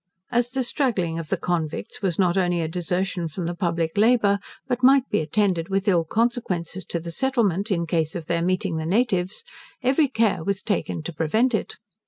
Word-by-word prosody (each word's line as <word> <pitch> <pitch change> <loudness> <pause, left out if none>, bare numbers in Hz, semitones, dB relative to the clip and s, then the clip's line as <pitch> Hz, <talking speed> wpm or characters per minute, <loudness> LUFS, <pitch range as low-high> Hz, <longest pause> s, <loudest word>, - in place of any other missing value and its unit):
As 240 0 +2
the 260 +1 -1
straggling 200 - 0
of 165 - -6
the - - +1
convicts 165 -4 -3
was 185 -5 0
not 180 -2 +3
only 175 -2 +1
a 160 - -1
desertion 180 +1 -2
from 165 +3 -5
the 170 - -2
public 170 -1 -1
labour, 215 -3 +4 0.3
but 250 -2 -1
might 265 +1 +5
be - - +1
attended 170 +1 0
with 195 +2 0
ill 175 -4 +3
consequences 195 -4 -1
to 170 - -2
the 170 +1 -6
settlement, 215 -3 +1
in 170 -4 0
case 160 -1 -1
of 170 -3 -4
their 170 +1 0
meeting 185 -1 0
the 160 0 -3
natives, 190 -2 +1 0.4
every 275 +4 +3
care 220 -8 +1
was 200 +1 -2
taken 190 -6 -2
to 175 - -5
prevent 215 - +1
it. 215 - -2
185 Hz, 195 wpm, -24 LUFS, 170-225 Hz, 0.4 s, might